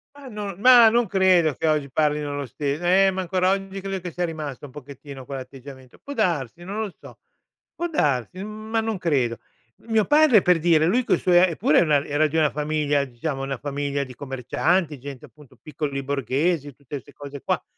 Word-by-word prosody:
Ma 285 -2 -13
non 205 -4 -6
ma 245 -1 +8
non 240 0 +2
credo 180 -6 +3
che - - -2
oggi 150 -3 0
parlino 150 0 0
lo 140 - -3
stes 140 +3 -3
eh 190 +2 +4
ma 190 0 -3
ancora 185 +1 0
oggi 195 0 -3
credo 195 0 -4
che 175 0 -6
sia 175 0 -1
rimasto 150 -4 -6
un - - -14
pochettino 140 -1 -11
quell’atteggiamento 130 -1 -10
può 285 - -9
darsi, 175 - -1
non 205 +4 -5
lo 210 - -4
so, - - -14 0.6
può 345 - -3
darsi, 165 - -1
ma 215 +1 -3
non 220 -2 -2
credo. 130 - 0 0.5
Mio 220 -2 +2
padre 295 -8 +5
per 180 -2 +3
dire, 160 -1 +3
lui 245 +9 +2
coi - - +2
suoi 175 -1 +3
eppure 175 -4 +3
era 150 -4 +3
era 150 +2 +1
di 155 - -7
una 155 -2 +3
famiglia, 150 -1 0
diciamo, 135 +3 -5
una 135 -1 -3
famiglia 140 +1 -3
di 130 -2 -11
commercianti, 145 +4 -1
gente 140 -1 -9
appunto 150 -3 -19
piccoli 140 -2 -4
borghesi, 140 +2 -1
tutte 140 0 -8
ste 145 - -18
cose 140 -1 -9
qua, - - -1
155 Hz, 190 wpm, -23 LUFS, 140-190 Hz, 0.6 s, ma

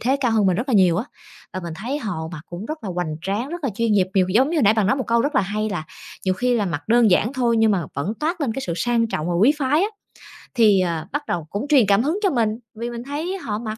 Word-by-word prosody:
thế 265 +4 +1
cao 245 -4 +1
hơn 215 -3 +3
mình 185 - +2
rất 245 +6 -3
là 245 - +1
nhiều 180 -4 +4
á, 220 - -1 0.5
và 185 - -4
mình 170 -2 -6
thấy 250 - -3
họ 175 - -4
mặc 155 - -6
cũng 175 +5 -7
rất 310 -6 -6
là 190 - -3
hoành 175 -3 -3
tráng, 205 +8 -2
rất 345 -1 -6
là 270 - 0
chuyên 230 -1 +1
nghiệp, 190 -2 +3
nhiều 190 -2 +3
giống 255 +9 +3
như 340 - -1
hồi 290 - +2
nãy 210 +1 +5
bạn 215 -3 +2
nói 235 - +2
một 260 - -3
câu 235 0 +2
rất 295 +2 -1
là - - +4
hay 210 +2 -2
là 160 -6 -3 0.4
nhiều 185 0 +1
khi 245 +3 +1
là 205 -3 0
mặc 165 0 -4
đơn 230 -2 +5
giản 215 +7 +2
thôi 240 -4 +1
nhưng 220 -1 +4
mà 185 -6 0
vẫn 150 +10 -2
toát 330 +3 -1
lên 250 -6 0
cái 270 - -4
sự 170 - -2
sang 235 +4 +1
trọng 160 -5 -3
và 175 - -1
quý 220 +12 +5
phái 290 +4 +2
á. 405 - +1 0.7
Thì, 215 -6 +5
ờ, 165 -3 -2
bắt 290 +1 -3
đầu 170 -3 -2
cũng 210 +8 -4
truyền 270 -7 +5
cảm 200 +3 +4
hứng 320 +8 0
cho 390 - +4
mình, 230 -6 +1 0.3
vì 235 +2 -4
mình 235 0 -6
thấy 315 +8 -4
họ 215 - -4
mặc, 220 -1 -5
220 Hz, 305 wpm, -22 LUFS, 190-260 Hz, 0.7 s, nãy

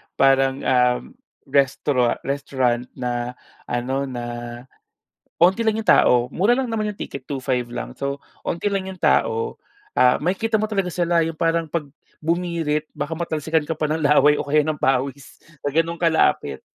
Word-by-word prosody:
parang, 135 0 +3
um, 125 -1 +3 0.5
restauran 135 -2 +2
restaurant 130 -3 0
na 125 -1 -3 0.3
ano, 130 +3 -1
na 120 -2 -5 1.2
onti 190 +7 +4
lang 220 -1 +2
'yong - - -7
tao. - - +6
Mura 200 - +2
lang 260 -2 -1
naman 215 -2 -1
'yong - - -18
ticket, 140 -2 -6
two-five 130 -3 -2
lang. 120 - -6
So, 140 0 -3 0.2
onti 170 +4 -1
lang 195 -1 -1
'yong 185 -2 -9
tao. 115 0 +1 0.4
Ah, 125 0 +5
makikita 195 +7 0
mo - - 0
talaga 195 -4 -1
sila 170 -1 +2
'yong 165 -1 -4
parang 165 -1 0
'pag 165 0 -2 0.4
bumirit 165 -3 -1
baka 155 - -5
matalsikan 160 -1 -1
ka - - 0
pa - - -2
ng 155 +1 -1
laway 150 0 +5
o - - -2
kaya 150 +1 +2
ng 155 -1 -2
pawis 135 +1 -1 0.2
sa 145 - -2
gano'n 165 +2 0
kalapit. 160 - +2
150 Hz, 160 wpm, -22 LUFS, 130-170 Hz, 1.2 s, tao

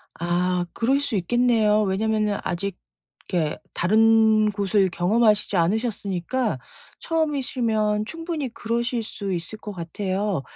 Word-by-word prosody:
아 175 +1 0
그럴 265 +5 +1
수 285 - -2
있겠네요. 215 +1 +2
왜냐면은 210 +1 0
아직 185 +2 -3 0.5
이렇게 155 -4 0 0.2
다른 220 +2 +4
곳을 200 -1 +1
경험하시지 210 +3 +2
않으셨으니까 205 - 0 0.4
처음이시면 245 -9 0
충분히 325 -2 -4
그러실 235 0 -2
수 200 -2 -5
있을 175 +5 -5
것 210 - -7
같아요. 190 0 -2
215 Hz, 285 characters per minute, -24 LUFS, 190-230 Hz, 0.5 s, 다른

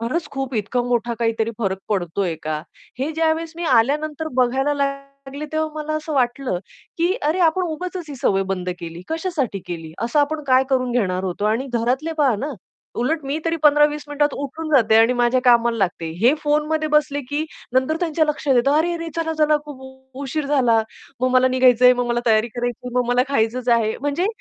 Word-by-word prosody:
खरंच 255 +9 -2
खूप 270 -1 -4
इतका 230 +3 -1
मोठा 240 -1 -1
काहीतरी 225 -1 0
फरक 195 -4 -1
पडतोय 185 -2 -1
का? 155 0 -2 0.4
हे 275 +4 -1
ज्यावेळेस 320 0 0
मी 345 - -4
आल्यानंतर 300 +5 +1
बघायला 265 +3 +2
लागले 275 +1 -4
तेव्हा 315 0 -1
मला 310 +1 -4
असं 310 0 -5
वाटलं, 250 -5 0 0.4
की 345 +3 +2
"अरे, 310 +5 +1
आपण 345 +2 +3
उगाचच 360 +2 -5
ही 290 - -6
सवय 195 -5 +1
बंद 180 -1 -4
केली. 170 0 -7
कशासाठी 320 - -2
केली? 165 -2 -6
असं 240 +6 +2
आपण 300 +1 -1
काय 260 0 +4
करून 255 -2 +1
घेणार 190 -6 0
होतो?" 185 +2 -3
आणि 225 +5 0
घरातले 250 +7 0
पहा 275 -5 +3
ना, 285 +8 -4 0.5
उलट 300 +4 -1
मी 280 +3 -2
तरी 330 0 0
15-20 295 0 +4
मिनिटात 290 0 0
उठून 295 +3 -5
जाते 225 -4 +4
आणि 225 +2 +5
माझ्या 245 +1 +2
कामाला 235 -1 +4
लागते. 175 -4 -1
हे 245 +6 +5
फोनमध्ये 305 +1 0
बसले 300 -1 +2
की 295 +2 -1 0.3
नंतर 260 +5 +1
त्यांच्या 325 -2 +1
लक्षात 295 -2 0
येतं, 260 +4 +3
"अरे, 335 +3 +2
अरे, 335 0 -5
चला, 325 -1 -1
चला, 305 0 +4
खूप 265 -2 -13
उशीर 280 +2 -3
झाला. 250 -6 +3 0.4
मग 255 - +2
मला 255 0 +5
निघायचंय, 250 -1 +5
मग 245 -1 -1
मला 240 0 0
तयारी 220 0 +3
करायची, 245 +1 -4
मग 250 0 +2
मला 245 +1 +3
खायचंच 250 -1 0
आहे." 230 -2 +2
म्हणजे 290 +6 0
265 Hz, 185 wpm, -21 LUFS, 235-300 Hz, 0.5 s, आणि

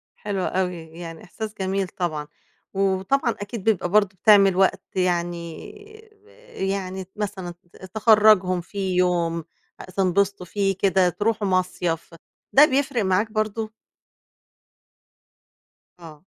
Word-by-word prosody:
حلو 200 -2 -3
أوي، 180 -1 -1
يعني 165 0 -10
إحساس 215 +3 -7
جميل 190 0 -1
طبعًا. 155 -5 -4 0.5
وطبعًا 195 +6 +1
أكيد 205 0 -6
بيبقى 200 -5 +1
برضه 200 0 +3
بتعمل 200 -3 +6
وقت 190 0 +2
يعني 175 -2 -2 0.5
ب 415 0 -28 0.3
يعني 190 -1 -2
ت 185 - -21
مثلًا 195 -4 -4 0.2
ت - - -12
تخرّجهم 210 -4 +5
في 190 0 -3
يوم 170 -2 +1 0.4
آآ، - - -8
تنبسطوا 195 +1 0
فيه 195 +1 0
كده، 190 -2 +3
تروحوا 210 +3 -1
مصيف، 180 -3 -1 0.4
ده 290 +3 +9
بيفرق 270 -4 0
معاك 195 +3 +1
برضه؟ 215 0 -2 2.3
آه. 160 -2 -13
190 Hz, 115 wpm, -23 LUFS, 180-210 Hz, 2.3 s, ده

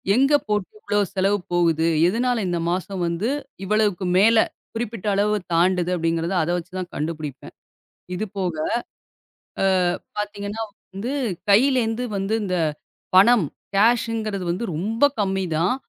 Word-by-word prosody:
எங்க 275 +4 +4
போட்டு 210 -2 -1
இவ்ளோ 205 0 0 0.2
செலவு 195 +2 +2 0.2
போகுது. 165 -2 +2 0.2
எதுனால 240 +5 +1
இந்த 175 -1 -1
மாசம் 185 +1 -3
வந்து 170 +6 -1 0.4
இவ்வளவுக்கு 205 -2 +1
மேல 225 +3 +5 0.4
குறிப்பிட்ட 225 -3 -4
அளவு 210 +1 +2 0.2
தாண்டுது, 180 +1 +2
அப்படிங்கறத 165 +1 -1
அத 155 - -3
வச்சு 175 +2 -7
தான் 185 -1 -5
கண்டுபிடிப்பேன். 150 -3 -5 0.6
இது 215 - -2
போக, 180 -3 -1 1.1
அ - - +4 0.5
பாத்தீங்கன்னா 205 +1 -4 0.3
வந்து 215 +7 -4 0.4
கையில 260 +7 +5
இருந்து 225 +2 -2
வந்து 195 +3 -1
இந்தப் 170 -6 0 0.4
பணம் 205 -1 +6 0.3
கேஷ்ஷிங்கிறது 220 -2 +2
வந்து 180 +7 -3
ரொம்ப 220 - -1 0.2
கம்மி 195 -1 0
தான். 180 +9 +2
195 Hz, 130 wpm, -23 LUFS, 175-220 Hz, 1.1 s, பணம்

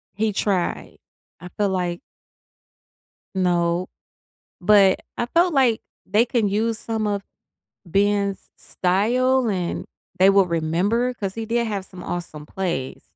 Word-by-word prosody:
He 215 +2 +1
tried, 195 -3 -1 0.4
I 180 - -8
feel 205 -1 +2
like 180 -2 -2 1.4
No, 175 -1 +1 0.7
but, 195 0 +5 0.2
I 240 - -1
felt 340 +5 +2
like 255 -5 +3 0.3
they 210 +4 +3
can 235 -4 +1
use 220 +3 0
some 220 -2 -2
of 200 -1 -1 0.6
Ben's 200 +2 0
style, 240 +7 +1
and 180 -4 -2 0.3
they 190 +2 +7
will 195 -1 +4
remember, 180 +9 0
'cause 195 -5 -4
he 225 - -4
did 235 +1 0
have 200 -3 -3
some 185 -1 -11
awesome 160 -4 -5
plays. 170 -9 -3
200 Hz, 130 wpm, -22 LUFS, 180-225 Hz, 1.4 s, they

